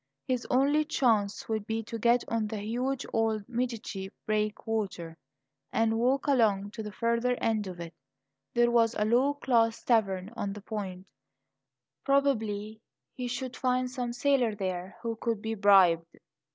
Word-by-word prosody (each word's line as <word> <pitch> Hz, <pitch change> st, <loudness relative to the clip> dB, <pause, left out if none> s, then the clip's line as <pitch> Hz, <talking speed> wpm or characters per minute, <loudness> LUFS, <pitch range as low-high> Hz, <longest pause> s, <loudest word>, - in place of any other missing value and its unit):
His 250 Hz, -2 st, -1 dB
only 280 Hz, +4 st, +3 dB
chance 225 Hz, -9 st, +1 dB
would 220 Hz, -2 st, -2 dB
be 225 Hz, 0 st, -2 dB
to 225 Hz, +1 st, -6 dB
get 240 Hz, +2 st, +3 dB
on 225 Hz, -2 st, -1 dB
to 220 Hz, -, -5 dB
the 205 Hz, -, -5 dB
huge 250 Hz, +5 st, -2 dB
old 220 Hz, -2 st, 0 dB
Medici 230 Hz, -6 st, -3 dB, 0.2 s
breakwater 210 Hz, -5 st, -2 dB, 0.6 s
and 225 Hz, 0 st, +1 dB
walk 260 Hz, +3 st, +2 dB
along 210 Hz, -7 st, +2 dB
to 220 Hz, -, -6 dB
the 210 Hz, -1 st, -6 dB
further 235 Hz, +3 st, +1 dB
end 215 Hz, -3 st, 0 dB
of 180 Hz, -2 st, -7 dB
it. 170 Hz, 0 st, -7 dB, 0.6 s
There 240 Hz, 0 st, +4 dB
was 230 Hz, -1 st, +3 dB
a 210 Hz, -, +1 dB
low 255 Hz, +6 st, +3 dB
class 230 Hz, -5 st, +1 dB
tavern 200 Hz, -4 st, +1 dB
on 200 Hz, -4 st, -3 dB
the 210 Hz, -, -9 dB
point; 195 Hz, -3 st, -5 dB, 1.0 s
probably 220 Hz, -6 st, 0 dB, 0.3 s
he 250 Hz, -1 st, -4 dB
should 250 Hz, +1 st, -4 dB
find 255 Hz, 0 st, 0 dB
some 250 Hz, -2 st, -3 dB
sailor 245 Hz, -3 st, +2 dB
there 185 Hz, -2 st, -4 dB
who 230 Hz, -1 st, -3 dB
could 230 Hz, -2 st, -1 dB
be 220 Hz, +1 st, -3 dB
bribed. 190 Hz, -5 st, +4 dB
225 Hz, 155 wpm, -29 LUFS, 205-245 Hz, 1.0 s, There